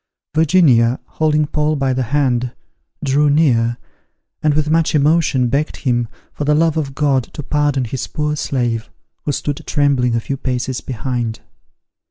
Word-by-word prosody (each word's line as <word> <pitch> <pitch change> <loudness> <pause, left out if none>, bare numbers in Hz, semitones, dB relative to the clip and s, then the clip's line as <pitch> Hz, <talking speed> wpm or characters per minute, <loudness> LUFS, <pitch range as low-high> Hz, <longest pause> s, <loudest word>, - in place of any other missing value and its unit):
Virginia, 145 -7 +4
holding 155 -1 +1
Paul 150 +1 0
by 135 -2 0
the 130 - -1
hand, 125 -1 0 0.5
drew 145 +2 +3
near, 120 -6 +2 0.6
and 150 -1 +2
with 155 -1 +1
much 165 -1 +2
emotion 145 -3 +3
begged 140 +5 -1
him, 120 -3 0 0.3
for - - -4
the 150 +1 +2
love 165 0 +2
of 140 -4 -3
God, 140 -5 +1
to 150 - -6
pardon 145 -2 0
his 125 +2 -4
poor 150 0 -2
slave, 120 -6 -2 0.4
who 145 - 0
stood 145 0 -3
trembling 135 -5 +2
a - - +2
few 135 +4 -4
paces 130 -1 -2
behind. 120 -3 -3
140 Hz, 155 wpm, -18 LUFS, 125-150 Hz, 0.6 s, Virginia